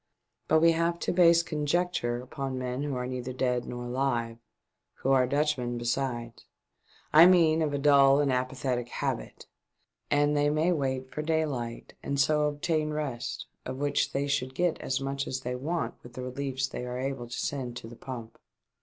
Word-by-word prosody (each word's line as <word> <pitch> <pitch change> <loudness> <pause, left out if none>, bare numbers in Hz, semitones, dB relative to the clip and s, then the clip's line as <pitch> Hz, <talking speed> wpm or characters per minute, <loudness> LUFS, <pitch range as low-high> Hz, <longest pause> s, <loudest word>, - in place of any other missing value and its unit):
But 160 0 +4
we 165 0 +6
have 170 +1 +1
to - - 0
base 170 -1 +5
conjecture 155 -5 -1
upon 135 0 -4
men 125 +1 -3
who 145 -2 -2
are 125 0 -2
neither 125 0 -4
dead 125 -1 0
nor 120 0 -6
alive, 120 -2 -1 0.6
who 135 - -1
are 130 -2 +4
Dutchmen 140 -4 0
besides, 120 -1 -3 0.7
I 160 +3 +10
mean 165 -3 +5
of 155 -2 +1
a 145 - -1
dull 140 -1 +6
and 140 -3 +2
apathetic 125 -1 -1
habit, - - -4 0.6
and 145 +1 +3
they 145 0 +3
may 155 +4 +2
wait 130 -4 -1
for 150 - -3
daylight 150 -7 -2
and 140 0 -2
so 150 +2 +3
obtain 155 +1 -1
rest, 145 -6 -3 0.2
of 130 0 -5
which 145 +1 0
they 140 +1 -1
should 135 -2 -1
get 175 +1 +1
as 130 - -1
much 135 0 -3
as 130 0 -3
they 125 -1 -3
want 160 +7 -2
with 120 - -13
the 130 - -6
reliefs 135 +1 -2
they 125 - -6
are 125 0 -4
able 130 -2 -3
to 120 - -6
send 125 -4 -3
to 115 - -8
the 120 - -10
pump." 115 -3 -8
135 Hz, 180 wpm, -28 LUFS, 125-150 Hz, 0.7 s, I